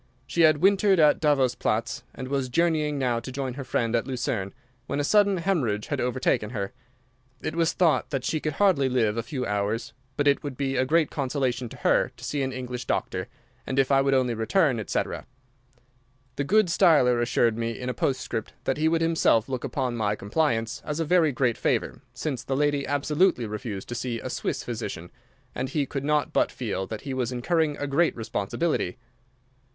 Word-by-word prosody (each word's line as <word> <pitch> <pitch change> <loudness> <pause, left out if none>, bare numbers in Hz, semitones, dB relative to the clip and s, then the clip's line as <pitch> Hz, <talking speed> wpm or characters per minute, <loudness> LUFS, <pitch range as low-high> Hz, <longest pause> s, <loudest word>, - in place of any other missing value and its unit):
She 170 - 0
had 155 -2 +6
wintered 195 -1 +4
at 150 -2 +5
Davos 140 -5 +3
Platz, - - -1
and 130 - -6
was 135 -1 -1
journeying 155 0 +1
now 125 -3 0
to 130 - -8
join 130 -1 -3
her 140 +2 -6
friends 120 -2 0
at 115 - 0
Lucerne, 115 -6 -2 0.4
when - - -2
a - - +1
sudden 200 +4 +4
hemorrhage 150 - -1
had - - -1
overtaken 125 -3 0
her. 100 -4 -4 0.7
It 155 - -3
was 165 -1 +2
thought 170 -4 +2
that 135 -4 -2
she 155 - 0
could 155 0 -2
hardly 145 -7 +3
live 115 -4 +1
a 115 - -1
few 130 0 -4
hours, 105 +2 -2 0.2
but 145 - +1
it 140 - +3
would 140 -4 -6
be 135 -1 -1
a 130 0 +1
great 160 +1 +2
consolation 130 -3 -1
to - - -11
her - - +2
to - - -13
see 145 - -2
an 135 -1 -1
English 125 -1 -5
doctor, - - -2 0.4
and, 130 - -3
if 135 0 +3
I 135 0 +5
would 135 0 +2
only 125 -2 +2
return, 125 - +2
etc. 105 - -3 1.1
The 140 - -2
good 215 +7 +4
Steiler 155 -9 +4
assured 120 -1 +2
me 115 0 -3
in 125 - -5
a 125 - -1
postscript 125 -5 -2
that 135 - 0
he 155 +1 +2
would 165 0 +2
himself 160 -9 +3
look 130 -2 -4
upon 130 -2 -2
my 105 -2 0
compliance 115 +1 -1
as 150 +1 -3
a 165 - 0
very 165 -1 +3
great 125 -2 0
favour, - - -1
since 140 -6 -4
the 135 - -2
lady 145 -1 +1
absolutely 145 0 +2
refused 105 -2 -5
to - - -3
see 120 -1 -3
a - - -5
Swiss - - -3
physician, 85 +2 -5 0.4
and 130 +1 -3
he 145 0 0
could 135 0 -4
not 150 0 +1
but - - +2
feel 95 - -3
that 110 - -6
he 135 - -5
was 130 -2 -1
incurring 150 +4 0
a 145 - -3
great 145 +4 +2
responsibility. 110 - -2
135 Hz, 200 wpm, -26 LUFS, 120-150 Hz, 1.1 s, had